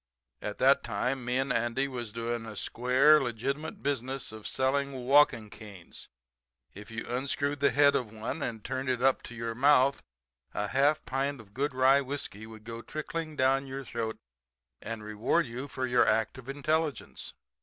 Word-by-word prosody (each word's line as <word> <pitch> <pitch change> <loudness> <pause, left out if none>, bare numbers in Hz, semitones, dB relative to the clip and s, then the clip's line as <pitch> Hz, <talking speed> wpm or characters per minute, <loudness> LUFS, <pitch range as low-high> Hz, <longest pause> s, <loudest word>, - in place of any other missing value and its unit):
At 105 0 -4
that 135 +2 +5
time 125 +5 -1
me 125 +1 0
and 135 +1 +1
Andy 120 +4 0
was 120 -5 -5
doing 115 0 -3
a 110 - -8
square, 130 +8 +4
legitimate 135 +5 -3
business 135 -2 -2
of 110 -1 -8
selling 135 -1 0
walking 125 -6 +4
canes. 100 -7 -10 0.7
If 105 0 -11
you 115 0 -5
unscrewed 140 +3 -1
the 140 - +4
head 145 0 +5
of 115 -5 -1
one 110 +8 -5
and 115 -6 -4
turned 130 +1 -3
it 125 -1 0
up 135 0 +4
to 120 - -9
your 115 0 -3
mouth 140 +2 +4 0.5
a 105 0 -1
half 140 +3 +2
pint 135 +3 -1
of 100 -3 -15
good 140 +3 -1
rye 135 +2 +5
whiskey 125 -6 -4
would 110 -1 -12
go 115 +1 -7
trickling 155 +3 -5
down 135 0 +2
your 135 0 -6
throat 115 -2 -3 0.7
to 115 - -3
reward 110 +10 0
you 125 +3 -6
for 130 -1 -3
your 125 -3 +3
act 110 +3 +1
of 130 +1 -11
intelligence. 150 +2 -1
130 Hz, 175 wpm, -30 LUFS, 115-140 Hz, 0.7 s, that